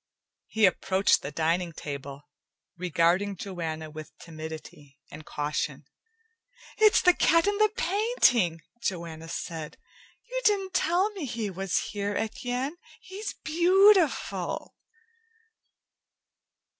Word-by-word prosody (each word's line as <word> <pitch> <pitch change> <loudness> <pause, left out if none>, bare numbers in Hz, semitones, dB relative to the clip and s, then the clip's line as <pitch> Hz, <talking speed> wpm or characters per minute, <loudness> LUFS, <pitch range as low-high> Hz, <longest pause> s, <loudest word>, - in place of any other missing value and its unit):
He 220 -1 +3
approached 190 +1 +2
the 140 - -5
dining 165 +3 0
table, 140 -1 -7 0.5
regarding 180 +3 +1
Joanna 165 -4 -5
with 155 0 -10
timidity 155 -3 -10
and 155 +1 -11
caution. 145 -1 -3 0.9
"It's 435 0 +5
the 360 - +7
cat 335 -1 +3
in 410 0 +1
the 430 0 +5
painting!" 350 - +2 0.2
Joanna 165 -3 -4
said. 160 -2 -5 0.5
"You - - -3
didn't 390 -3 +2
tell 365 +4 +2
me 385 -7 -6
he 225 -5 -3
was 190 0 -2
here, 205 -1 -2
Etienne. 250 +7 -3 0.2
He's 390 +3 -7
beautiful!" 360 +2 +3
195 Hz, 105 wpm, -27 LUFS, -, 0.9 s, the